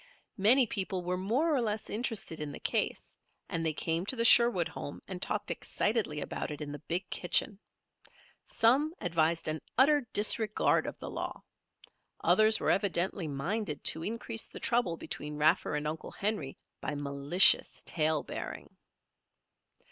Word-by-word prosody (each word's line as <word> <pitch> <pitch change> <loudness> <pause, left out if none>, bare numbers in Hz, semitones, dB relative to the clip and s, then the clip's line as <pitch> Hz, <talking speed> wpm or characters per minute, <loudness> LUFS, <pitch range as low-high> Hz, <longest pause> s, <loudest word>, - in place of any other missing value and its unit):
Many 245 +7 +5
people 190 -3 -3
were 180 +1 -2
more 240 - 0
or 260 - +1
less 215 -2 -3
interested 215 -7 -2
in 150 -1 -4
the - - -8
case - - -2 0.3
and 165 - -3
they 160 - +1
came 165 +3 -2
to 260 - -2
the 230 -1 +1
Sherwood 235 -8 +6
home 145 - -8
and 185 -2 -7
talked 210 +1 -2
excitedly 210 -9 -1
about - - -5
it 150 - -7
in 150 -1 -6
the 145 - -7
big 170 +4 -3
kitchen. 190 +2 0 0.8
Some 280 +8 +2
advised 165 -1 0
an 155 0 -1 0.2
utter 290 +3 +5
disregard 215 +1 +2
of - - -6
the - - -8
law. - - -6 0.8
Others 215 0 +5
were - - +1
evidently 190 -2 0
minded 155 +5 -3
to 160 - +2
increase 225 +1 -3
the - - -11
trouble 235 -9 0
between 150 -1 -6
Raffer 155 +1 +2
and 150 0 -2
Uncle 155 +1 -5
Henry 195 -10 -3 0.2
by 150 - -4
malicious 145 +5 +4
tale 155 -2 +1
bearing. - - -8
180 Hz, 155 wpm, -30 LUFS, 155-220 Hz, 0.8 s, Sherwood